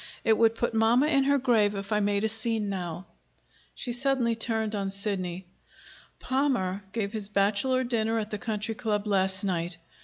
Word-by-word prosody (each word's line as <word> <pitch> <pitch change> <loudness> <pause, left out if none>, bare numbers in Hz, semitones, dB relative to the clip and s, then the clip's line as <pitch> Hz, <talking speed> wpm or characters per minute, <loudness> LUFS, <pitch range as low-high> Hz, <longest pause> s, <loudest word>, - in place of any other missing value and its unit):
It 220 - +4
would 225 0 +3
put 235 0 -1
mamma 225 +5 +4
in 275 -3 +3
her 280 +1 +4
grave 225 -6 +2
if 195 +1 -6
I 210 - +3
made 205 0 +1
a - - +3
scene 220 -1 -1
now." 175 -2 -4 0.7
She 245 - -4
suddenly 250 -2 +1
turned 220 -1 -1
on 200 -2 -1
Sidney. 195 -3 -3 0.7
"Palmer 245 -8 0
gave 205 -1 -2
his 210 -2 -1
bachelor 210 +6 +2
dinner 225 -2 0
at 220 -1 -3
the 210 - -3
Country 215 0 -3
Club 215 -3 -2
last 190 -1 +1
night. 175 -3 -2
215 Hz, 175 wpm, -28 LUFS, 200-235 Hz, 0.7 s, It